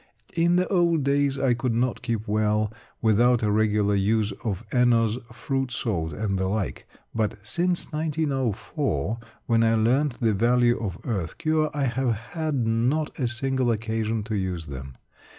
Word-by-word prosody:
In 170 +1 +3
the 180 +1 +2
old 170 -5 +3
days 140 0 +2
I 130 -3 +2
could 120 0 -1
not 125 +1 0
keep 115 -2 -2
well 105 0 +1 0.3
without 115 +2 +4
a 105 - +2
regular 105 -1 +2
use 105 +2 +1
of 105 -1 -3
Eno's 120 -2 +3
Fruit 135 +2 -2
salt 85 -10 -2
and 100 +3 -2
the 95 - 0
like. 100 0 -3 0.3
But, 110 -2 0
since 175 +10 -1
1904, 140 - -1 0.3
when 115 -1 +3
I 115 0 +4
learnt 125 +4 +2
the 115 -3 +2
value 120 +3 +3
of 95 -5 -3
earth 95 -9 -3
cure, 155 -1 +1
I 145 -2 -2
have 125 -1 +1 0.2
had 155 -7 -1
not 125 +9 0
a 125 - +1
single 130 +1 0
occasion 110 0 -1
to 110 0 -3
use 90 -4 -2
them. 65 -2 -8
115 Hz, 160 wpm, -25 LUFS, 105-135 Hz, 0.3 s, without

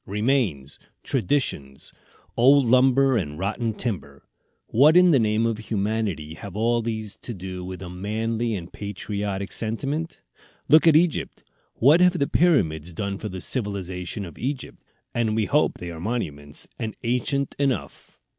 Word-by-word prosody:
remains, 105 - 0 0.2
traditions! 90 - -2 0.4
Old 135 +3 +5
lumber 130 +1 +4
and 75 -7 -3
rotten 110 +5 -1
timber! 90 - -5 0.4
What 150 +8 +5
in 180 -1 +7
the 140 - +5
name 110 0 +2
of 115 -2 -1
humanity 105 -7 -2
have 95 +3 -9
all 115 +2 +1
these 110 -2 -4
to 120 - -6
do 90 -1 -6
with 95 +1 -7
a - - -7
manly 110 +5 -2
and 90 -3 -7
patriotic 100 -1 -4
sentiment? 140 +9 -3 0.5
Look 155 +2 +6
at 160 - +7
Egypt; 170 +1 +1 0.3
what 150 +8 +5
have 180 0 +4
the 140 - +2
Pyramids 90 - +2
done 100 +2 -3
for 105 - -5
the 95 -1 -6
civilization 100 -4 -3
of 85 - -11
Egypt? 130 0 -5 0.3
and 110 -2 0
we 110 -1 +1
hope 150 +6 +2
they 90 -1 -6
are 80 - -8
monuments, 75 -9 -4
and 110 -1 -4
ancient 125 +3 -1
enough. 135 -3 -3
110 Hz, 150 wpm, -24 LUFS, 95-130 Hz, 0.5 s, in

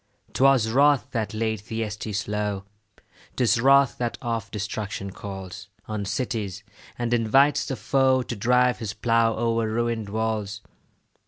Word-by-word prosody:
'Twas 135 -4 +4
wrath 140 0 +3
that 110 -3 -2
laid 110 0 -1
Thyestes 105 -2 -4
low; 105 -2 -2 0.7
'Tis 120 -2 +2
wrath 135 0 +4
that 120 -1 -2
oft 115 -3 -3
destruction 105 -1 -4
calls 95 +1 -8 0.2
On 105 -2 -3
cities, 105 -4 -3 0.3
and 120 0 -1
invites 135 +5 +3
the 135 - -2
foe 130 -1 +2
To 120 - -5
drive 125 +4 +2
his 105 -3 -4
plough 115 0 +2
o'er 115 -1 0
ruin'd 115 -2 -1
walls. 105 -1 -2
115 Hz, 135 wpm, -25 LUFS, 105-125 Hz, 0.7 s, Twas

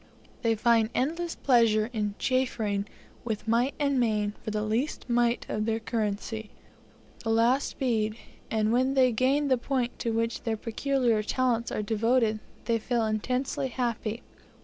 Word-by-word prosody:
They 230 -2 +2
find 225 0 +3
endless 335 +6 -1
pleasure 230 -3 +3
in 210 -2 -1
chaffering 220 -6 0 0.4
with 220 -2 -4
might 240 +4 +2
and 280 -2 +2
main 210 -3 +1
for - - -5
the 210 0 -1
least 230 +8 -1
mite 240 0 +2
of 215 0 -2
their 225 0 +1
currency 220 -1 -3 0.7
the 225 - -2
last 235 +5 +2
bead; 220 -4 0 0.3
and 220 0 +1
when 260 +2 +2
they 255 -2 +5
gain 270 +5 +2
the 260 -3 +2
point 250 -1 -2
to 235 - -1
which 230 +1 -1
their 225 -1 -2
peculiar 235 0 +1
talents 235 +1 0
are 210 - -2
devoted, 225 +1 +2 0.3
they 230 -1 +1
feel 235 0 0
intensely 250 +5 -1
happy. 235 -3 -3
230 Hz, 150 wpm, -28 LUFS, 220-255 Hz, 0.7 s, they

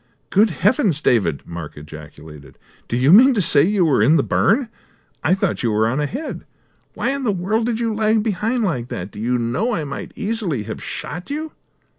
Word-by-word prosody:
"Good 210 +3 +4
heavens, 205 - +1
David," 100 - +1
Mark 85 -4 -8
ejaculated, 75 -2 -12 0.3
"do 120 - -2
you 135 +6 +4
mean 255 +5 +7
to - - +1
say 150 -5 +4
you 190 +3 +2
were 145 -9 +2
in 145 +9 +5
the 140 - +2
burn? 235 +5 +2 0.6
I 185 - +3
thought 195 - -1
you 120 - 0
were 110 +1 +2
on 130 +5 -1
ahead! 240 - -4 0.5
Why - - -1
in 275 0 -3
the 230 - +1
world 205 +5 -1
did 230 -2 -1
you 230 -2 -1
lag 215 0 +1
behind 225 +3 -1
like 130 - -2
that? 95 -2 -6
Do 105 - -10
you 125 +3 0
know 130 - -1
I 160 - -2
might 140 -1 -6
easily 205 - -2
have - - -7
shot 175 - -6
you?" 305 +2 -4
175 Hz, 200 wpm, -20 LUFS, -, 0.6 s, mean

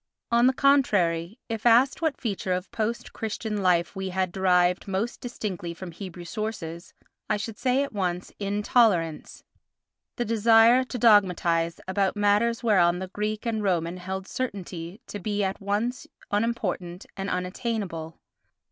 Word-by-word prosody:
On 235 +1 +5
the 260 - +4
contrary, 205 - +2
if 225 -2 -4
asked 240 +5 +4
what 320 -3 0
feature 195 -5 -2
of 180 +1 -4
post 235 0 -3
Christian 215 -1 -3
life 175 -1 +2
we 190 0 -3
had 185 -1 -1
derived 180 0 +2
most 200 +5 -2
distinctly 185 -8 -5
from 180 +1 -8
Hebrew 175 0 -8
sources 175 -5 -5 0.3
I - - +2
should 210 0 -6
say 255 +2 +2
at 280 - -6
once 180 -3 -2
"intolerance"—the 200 -5 +1 0.8
desire 230 +3 +5
to 255 0 -6
dogmatise 180 -7 +3
about 195 +1 0
matters 210 +3 +2
whereon 180 -6 +4
the 185 0 -5
Greek 210 +3 -3
and 225 -2 -1
Roman 175 -3 0
held 190 +1 -5
certainty 190 -6 -5
to 205 - -7
be 205 +1 -1
at 190 +1 -2
once 210 +5 -2 0.2
unimportant 205 -5 -2
and 195 0 -4
unattainable. 180 -4 -3
200 Hz, 140 wpm, -26 LUFS, 180-225 Hz, 0.8 s, On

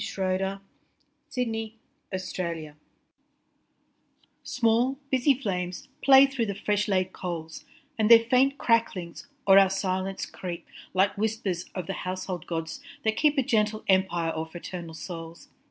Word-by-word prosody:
John 190 +1 -2 0.7
Keats - - -13
To 250 -1 +1
My 225 -1 -4 0.6
Brothers 165 -4 -4 1.7
SMALL, 240 +2 +1
busy 265 +1 +4
flames 185 +2 -3
play 270 0 +8
through 270 -4 -2
the 200 - -3
fresh 205 +1 0
laid 185 -2 0
coals, 165 -3 -6 0.3
And 215 0 +3
their 230 -1 +8
faint 265 +3 +3
cracklings 225 -9 0 0.2
o'er 195 0 +9
our 195 -1 +5
silence 190 0 -2
creep 175 -2 -7 0.3
Like 195 +2 +3
whispers 210 -5 -1
of 185 -3 -3
the 195 - -3
household 185 -2 -4
gods 165 -1 -4 0.2
that 220 0 +1
keep 300 +4 +3
A 270 - +4
gentle 215 -2 +1
empire 175 -4 +2
o'er 160 0 -3
fraternal 170 0 -7
souls. 165 -1 -8
195 Hz, 140 wpm, -27 LUFS, 180-225 Hz, 1.7 s, o'er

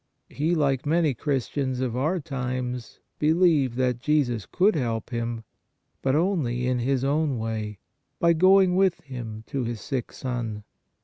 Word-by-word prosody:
He, 160 +5 0
like 140 -5 +1
many 160 -2 +3
Christians 130 0 -2
of 125 -3 -1
our 155 +8 0
times, 125 -5 -4 0.2
believed 155 -5 +3
that 125 -2 +1
Jesus 130 -6 +1
could 195 +4 +3
help 115 -6 -2
him, 115 -1 -3 0.6
but 130 +1 +1
only 150 -9 +1
in 125 -1 +1
his 130 +1 0
own 145 -1 +1
way, 110 -2 -3 0.4
by 170 0 +4
going 185 +2 +5
with 190 -2 +2
him 120 -6 -7
to 135 -2 -3
his 120 -1 -3
sick 130 0 -3
son. 115 -5 -4
130 Hz, 145 wpm, -26 LUFS, 120-155 Hz, 0.6 s, going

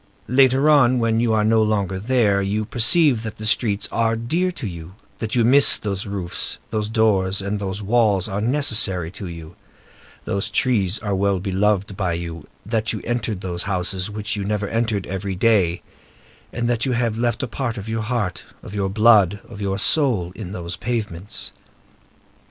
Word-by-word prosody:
Later 135 +2 +4
on, 135 -5 +5
when 115 -1 +1
you 115 -1 +1
are 110 -1 +2
no 110 +1 +3
longer 100 -3 0
there, 105 -3 +2
you 105 +2 -1
perceive 125 +3 +3
that 110 -1 -6
the 110 - -6
streets 110 -2 +1
are 115 -1 +1
dear 165 +12 -1
to 140 - -7
you; 85 -1 -8 0.2
that 110 0 -3
you 120 -2 +3
miss 140 +4 +6
those 100 -1 -4
roofs, 95 -3 -3
those 105 -1 -2
doors; 100 -4 +1
and 100 +1 -3
that - - -5
those 100 +2 -4
walls 105 -3 +2
are 100 0 -3
necessary 110 - +2
to 95 0 -8
you, 85 0 -9 0.7
those 100 -2 -1
trees 105 -6 +1
are 105 -2 -3
well 100 0 +1
beloved 100 +1 0
by 95 -3 -1
you; 85 0 -6 0.2
that 110 0 -1
you - - -5
entered 115 -5 -2
those 85 -2 -4
houses 95 +1 -1
which 105 +1 -4
you 100 - -3
never 105 0 -2
entered, 115 -4 -1
every 95 +1 -4
day, 95 -4 +2 0.7
and 120 0 -2
that 120 -1 0
you 130 - 0
have 120 -2 0
left 120 +2 -1
a - - -2
part 120 0 -3
of 100 +1 -7
your 110 0 -2
heart, 105 -5 -2 0.2
of - - -10
your 100 -2 -1
blood, 105 -2 +4
of 105 -3 -10
your 100 -1 -1
soul, 110 - +2
in 95 -4 -7
those 85 -2 -5
pavements. 105 -6 -4
105 Hz, 185 wpm, -21 LUFS, 95-115 Hz, 0.7 s, miss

